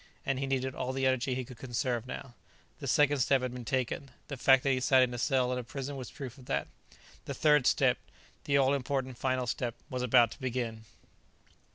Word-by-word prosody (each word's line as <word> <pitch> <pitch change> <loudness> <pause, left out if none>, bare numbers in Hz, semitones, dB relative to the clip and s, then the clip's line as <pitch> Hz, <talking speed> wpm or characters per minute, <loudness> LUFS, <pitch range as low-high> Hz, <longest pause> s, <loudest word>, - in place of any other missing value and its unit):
And 135 -1 0
he 135 - -2
needed 130 -1 -1
all 130 0 -3
the 135 0 0
energy 130 0 +1
he 130 -1 -3
could 125 -1 -12
conserve 120 -1 -2
now. 125 0 -7 0.5
The - - -6
second 145 -1 +3
step 130 +1 +3
had 125 -1 -3
been 125 -1 -6
taken 130 +2 -2 0.2
the 140 - -3
fact 130 0 +5
that 135 - +2
he 130 - +2
sat 130 0 +5
in 125 -1 -1
a 120 - -4
cell 125 -1 +1
in 125 - -3
prison 135 +3 -5
was 130 -3 -6
proof 135 -2 -8
of 125 - -15
that. - - -1 0.6
The - - -4
third 150 -4 +4
step - - +3 0.5
the 140 - +3
all 135 0 +4
important 130 -2 -2
final 130 -1 0
step 120 0 -2 0.2
was 125 -1 -2
about 120 -2 +5
to - - -11
begin. 120 -4 -3
130 Hz, 215 wpm, -31 LUFS, 125-135 Hz, 0.6 s, fact